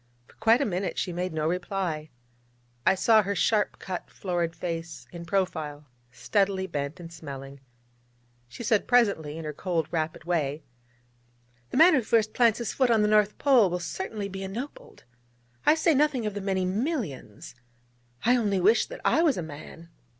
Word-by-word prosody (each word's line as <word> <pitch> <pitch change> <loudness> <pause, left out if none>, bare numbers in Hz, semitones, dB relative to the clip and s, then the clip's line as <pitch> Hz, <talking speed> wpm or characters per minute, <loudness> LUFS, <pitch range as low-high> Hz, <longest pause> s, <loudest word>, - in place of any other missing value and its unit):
For - - -22
quite 225 +4 +4
a - - +2
minute 185 -1 -2
she 180 - -2
made 180 +1 -2
no 155 -1 -1
reply. 175 -3 -2 0.8
I - - +6
saw 215 +3 +5
her 200 0 -2
sharp 210 +3 +1
cut, 185 -2 -6
florid 175 -3 -2
face 165 -1 -5
in 170 -1 -8
profile, 160 -6 -2 0.3
steadily 195 - 0
bent 150 -1 -4
and 170 -1 -10
smelling. 140 -3 -9 0.9
She 125 - -9
said 215 -2 +1
presently 200 -11 +2
in 165 - -6
her 150 - -4
cold, 165 -1 -2
rapid 160 -2 -2
way: 155 -3 -1 1.1
'The - - -3
man 340 +4 +8
who 270 - +4
first 215 -1 +1
plants 235 -2 +4
his 235 - -3
foot 260 -2 +2
on 225 -2 +4
the - - +3
North 210 -1 +3
Pole 255 -9 +5
will 180 - -1
certainly 190 +4 -4
be 195 0 -7
ennobled. 225 +9 -7 0.6
I 305 - +7
say 325 0 +3
nothing 280 -4 +2
of 210 - -2
the 205 - -4
many 190 -1 0
millions... 195 - -3 0.7
I 245 +2 +5
only 205 -5 +1
wish 210 +6 +4
that - - -9
I - - +4
was 315 - +3
a 175 - -2
man!' 160 +2 -10
190 Hz, 175 wpm, -27 LUFS, 165-220 Hz, 1.1 s, man